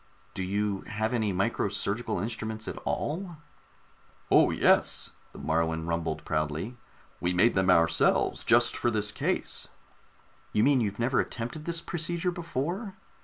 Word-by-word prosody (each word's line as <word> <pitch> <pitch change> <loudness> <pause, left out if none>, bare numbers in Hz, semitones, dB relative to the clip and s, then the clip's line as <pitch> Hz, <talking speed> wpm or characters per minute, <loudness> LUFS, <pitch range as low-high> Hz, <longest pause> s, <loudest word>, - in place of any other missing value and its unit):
"Do - - -4
you 100 +1 -1
have 110 +2 -1
any 110 -4 +1
micro 95 +4 0
surgical 100 +4 -2
instruments 110 +1 -4
at - - -5
all?" 175 +2 -2 0.9
"Oh, - - +6
yes," - - +3 0.2
the - - -13
Moruan 80 0 0
rumbled 80 -2 -2
proudly. 75 +9 -2 0.4
"We 90 +1 0
made 100 +7 +4
them 95 -1 +2
ourselves, 85 -2 +3
just - - +4
for 120 - +1
this 105 -2 0
case." - - -2 0.9
"You 105 - +3
mean 135 -1 +4
you've 100 -2 -1
never 120 +2 +1
attempted 120 +6 -3
this 170 -1 0
procedure 170 +1 -2
before?" 175 - -3
110 Hz, 140 wpm, -28 LUFS, 90-135 Hz, 0.9 s, Oh